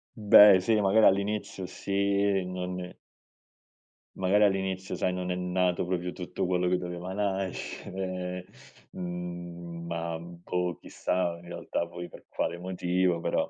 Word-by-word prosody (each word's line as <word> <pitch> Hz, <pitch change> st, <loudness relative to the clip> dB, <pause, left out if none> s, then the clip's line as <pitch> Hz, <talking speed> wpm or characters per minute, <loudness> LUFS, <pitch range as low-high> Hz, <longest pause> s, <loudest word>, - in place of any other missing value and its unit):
Beh, 105 Hz, -2 st, +8 dB
sì, 110 Hz, +3 st, +2 dB
magari, 105 Hz, +3 st, +5 dB
all'inizio. 100 Hz, 0 st, +1 dB
Sì, 100 Hz, +1 st, +1 dB
non 90 Hz, 0 st, -4 dB, 1.2 s
Magari 95 Hz, +3 st, +3 dB
all'inizio, 95 Hz, -1 st, 0 dB
sai, 90 Hz, -, 0 dB
non 90 Hz, 0 st, -3 dB
è -, -, 0 dB
nato 90 Hz, 0 st, 0 dB
proprio 90 Hz, 0 st, -2 dB
tutto 90 Hz, 0 st, -4 dB
quello 90 Hz, 0 st, +1 dB
che 90 Hz, 0 st, +3 dB
doveva 90 Hz, +1 st, -5 dB
nascere, 95 Hz, -2 st, -3 dB, 0.5 s
mhmm, 85 Hz, -1 st, -6 dB
ma 85 Hz, -1 st, -3 dB
boh, 85 Hz, +1 st, -3 dB
chissà, 90 Hz, -2 st, -1 dB
in 85 Hz, -, -14 dB
realtà, 85 Hz, 0 st, -3 dB
poi 85 Hz, +1 st, -7 dB
per -, -, -14 dB
quale 85 Hz, -, -2 dB
motivo, 90 Hz, -1 st, 0 dB
però, -, -, 0 dB
90 Hz, 130 wpm, -29 LUFS, 90-95 Hz, 1.2 s, Beh